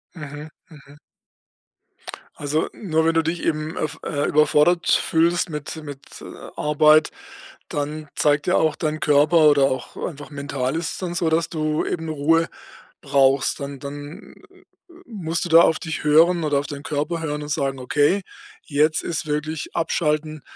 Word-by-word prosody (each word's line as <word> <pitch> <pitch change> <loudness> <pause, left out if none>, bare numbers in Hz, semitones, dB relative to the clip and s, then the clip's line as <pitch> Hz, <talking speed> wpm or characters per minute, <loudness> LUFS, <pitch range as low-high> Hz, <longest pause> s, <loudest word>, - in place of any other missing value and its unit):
Mhm, 150 -1 -8 0.2
mhm. 145 -2 -16 1.4
Also 150 +2 -1
nur, 160 -6 -1
wenn 165 - +3
du 165 - +3
dich 165 +2 -3
eben, 155 0 -2
äh, - - -3
f 155 - -4 0.3
überfordert 150 +3 +3
fühlst 170 +2 +2
mit 150 0 -5
mit, 145 -2 -10
äh, - - -10 0.3
Arbeit, 150 +1 +4 0.6
dann 150 +1 -4
zeigt 145 -1 +1
ja 180 - +3
auch 155 -2 +2
dein 155 -1 -2
Körper 150 +2 +4
oder 145 -2 +4
auch 130 -1 -3
einfach 145 -4 -9
mental 140 -2 -3
ist 165 0 -2
es - - -7
dann 180 -2 -4
so, 170 -1 0
dass 160 +1 +1
du 155 -1 -1
eben 165 -2 -3
Ruhe 160 +2 +2 0.5
brauchst. 135 0 +2
Dann 140 -1 -6
dann, 145 +7 -9 0.2
äh, 375 -1 -22 0.4
musst 170 - -3
du - - -5
da 165 +1 +8
auf 160 - +3
dich 160 -3 -5
hören 165 +3 +4
oder 145 -2 +1
auf 145 - -5
deinen 145 -1 -7
Körper 155 +2 -2
hören 150 -2 -3
und 145 - -8
sagen: 135 -1 -1
„Okay, 145 +9 +2 0.4
jetzt 155 +1 +1
ist 165 -1 -3
wirklich 150 +1 -3
Abschalten 155 -2 -1
155 Hz, 165 wpm, -22 LUFS, 145-165 Hz, 1.4 s, da